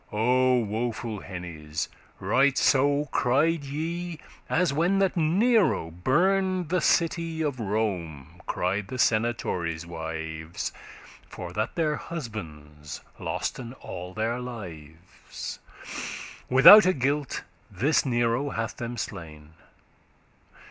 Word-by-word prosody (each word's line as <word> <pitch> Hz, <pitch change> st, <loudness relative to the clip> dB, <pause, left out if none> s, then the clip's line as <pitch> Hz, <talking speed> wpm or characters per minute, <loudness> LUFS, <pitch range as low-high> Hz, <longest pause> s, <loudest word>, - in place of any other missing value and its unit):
O 125 Hz, +4 st, +3 dB
woeful 110 Hz, 0 st, -3 dB
hennes! 80 Hz, -5 st, -5 dB, 0.3 s
right 135 Hz, 0 st, +3 dB
so 145 Hz, +2 st, +3 dB
cried 145 Hz, +5 st, +2 dB
ye, 165 Hz, +4 st, -4 dB, 0.3 s
As, 175 Hz, -4 st, +2 dB
when 170 Hz, +6 st, +2 dB
that 195 Hz, -1 st, +2 dB
Nero 185 Hz, -, +3 dB
burned 180 Hz, -, +1 dB
the 180 Hz, 0 st, +1 dB
city 165 Hz, -1 st, +1 dB
Of 140 Hz, -4 st, -2 dB
Rome, 95 Hz, -, -3 dB
cried 95 Hz, +3 st, -1 dB
the 130 Hz, -, -5 dB
senatores' 100 Hz, -9 st, 0 dB
wives, 80 Hz, -1 st, -5 dB, 0.6 s
For 90 Hz, -1 st, -7 dB
that 110 Hz, +4 st, -2 dB
their 155 Hz, -3 st, +1 dB
husbands 75 Hz, -, -7 dB, 0.2 s
losten 120 Hz, -2 st, -4 dB
all 90 Hz, +1 st, -8 dB
their 115 Hz, +3 st, -1 dB
lives; 85 Hz, -9 st, -8 dB, 0.9 s
Withoute 185 Hz, +8 st, +9 dB
guilt 140 Hz, +2 st, -1 dB, 0.3 s
this 125 Hz, -, +2 dB
Nero 120 Hz, +2 st, +1 dB
hath 115 Hz, -3 st, -3 dB
them 120 Hz, 0 st, -5 dB
slain. 75 Hz, -6 st, -7 dB
120 Hz, 100 wpm, -27 LUFS, -, 0.9 s, Withoute